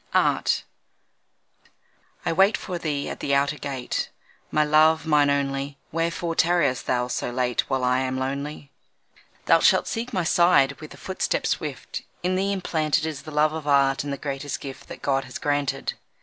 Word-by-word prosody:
Art -, -, +2 dB, 1.6 s
I -, -, +1 dB
wait 195 Hz, +5 st, +4 dB
for 180 Hz, -2 st, -5 dB
thee 150 Hz, -4 st, -2 dB
at -, -, -5 dB
the 140 Hz, -, +1 dB
outer 140 Hz, +2 st, +1 dB
gate, 135 Hz, -3 st, -3 dB, 0.4 s
My 155 Hz, -, +3 dB
love, 155 Hz, +2 st, +4 dB
mine 150 Hz, -2 st, +4 dB
only; 140 Hz, 0 st, -1 dB
Wherefore 165 Hz, +1 st, -1 dB
tarriest 165 Hz, -6 st, +2 dB
thou 125 Hz, -1 st, +1 dB
so 125 Hz, -, -2 dB
late 125 Hz, 0 st, 0 dB
While 135 Hz, -1 st, 0 dB
I 125 Hz, 0 st, +3 dB
am 130 Hz, 0 st, -1 dB
lonely. 140 Hz, +2 st, -4 dB, 0.7 s
Thou -, -, +6 dB
shalt -, -, +4 dB
seek 235 Hz, +2 st, -3 dB
my 185 Hz, -6 st, 0 dB
side 170 Hz, -5 st, +4 dB
with 155 Hz, -, -9 dB
a -, -, -16 dB
footstep 190 Hz, -, -2 dB
swift, -, -, -3 dB, 0.2 s
In 180 Hz, +1 st, +1 dB
thee 195 Hz, +2 st, +1 dB
implanted 160 Hz, -5 st, 0 dB
Is 155 Hz, -3 st, -4 dB
the 155 Hz, -, -10 dB
love 150 Hz, +1 st, +2 dB
of 160 Hz, -2 st, -5 dB
Art 140 Hz, -1 st, +3 dB
and 145 Hz, -, -4 dB
the 140 Hz, -, -3 dB
greatest 140 Hz, -1 st, -4 dB
gift 135 Hz, -2 st, -9 dB
That -, -, -10 dB
God 135 Hz, -1 st, +1 dB
has 125 Hz, -, -7 dB
granted. 145 Hz, -2 st, -1 dB
145 Hz, 175 wpm, -25 LUFS, 135-160 Hz, 1.6 s, Thou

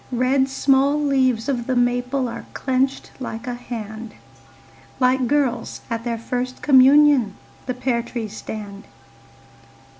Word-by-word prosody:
Red 260 Hz, +2 st, +2 dB
small 275 Hz, +2 st, +2 dB
leaves 260 Hz, -5 st, +1 dB
of 245 Hz, -4 st, -2 dB
the 260 Hz, -, 0 dB
maple 245 Hz, +2 st, 0 dB
Are 235 Hz, 0 st, -7 dB
clenched 265 Hz, +1 st, -1 dB
like 230 Hz, -3 st, -6 dB
a 250 Hz, -, -3 dB
hand, 225 Hz, -2 st, -7 dB, 0.8 s
Like 255 Hz, 0 st, +2 dB
girls 255 Hz, -4 st, -1 dB
at 230 Hz, 0 st, -2 dB
their 235 Hz, -1 st, -2 dB
first 250 Hz, +2 st, -4 dB
communion 275 Hz, -5 st, +5 dB, 0.3 s
The 255 Hz, -, -2 dB
pear 250 Hz, -2 st, 0 dB
trees 230 Hz, -3 st, -6 dB
stand. 205 Hz, -1 st, -8 dB
250 Hz, 125 wpm, -21 LUFS, 235-265 Hz, 0.8 s, communion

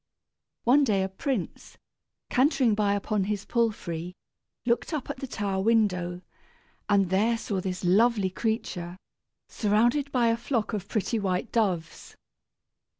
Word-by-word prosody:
One 270 Hz, +5 st, +5 dB
day 205 Hz, -7 st, +2 dB
a -, -, 0 dB
prince, 195 Hz, +1 st, -4 dB, 0.5 s
cantering 260 Hz, -3 st, +3 dB
by 205 Hz, -1 st, +2 dB
upon 205 Hz, -1 st, -1 dB
his 205 Hz, 0 st, -3 dB
palfrey, 180 Hz, -7 st, -2 dB, 0.5 s
looked 240 Hz, +7 st, 0 dB
up 295 Hz, -5 st, -3 dB
at -, -, -8 dB
the 270 Hz, -, -6 dB
tower 200 Hz, -5 st, -2 dB
window, 185 Hz, -5 st, +1 dB, 0.7 s
and 195 Hz, -3 st, +3 dB
there 220 Hz, +5 st, +2 dB
saw 200 Hz, -4 st, -3 dB
this 185 Hz, 0 st, -4 dB
lovely 200 Hz, +1 st, +3 dB
creature, 185 Hz, -5 st, -3 dB, 0.5 s
surrounded 240 Hz, +7 st, +1 dB
by 240 Hz, -3 st, +3 dB
a 230 Hz, -, +1 dB
flock 235 Hz, -2 st, -2 dB
of 200 Hz, -2 st, -3 dB
pretty 220 Hz, +1 st, -1 dB
white 190 Hz, +1 st, -1 dB
doves. 190 Hz, -8 st, -1 dB
210 Hz, 135 wpm, -27 LUFS, 190-235 Hz, 0.7 s, One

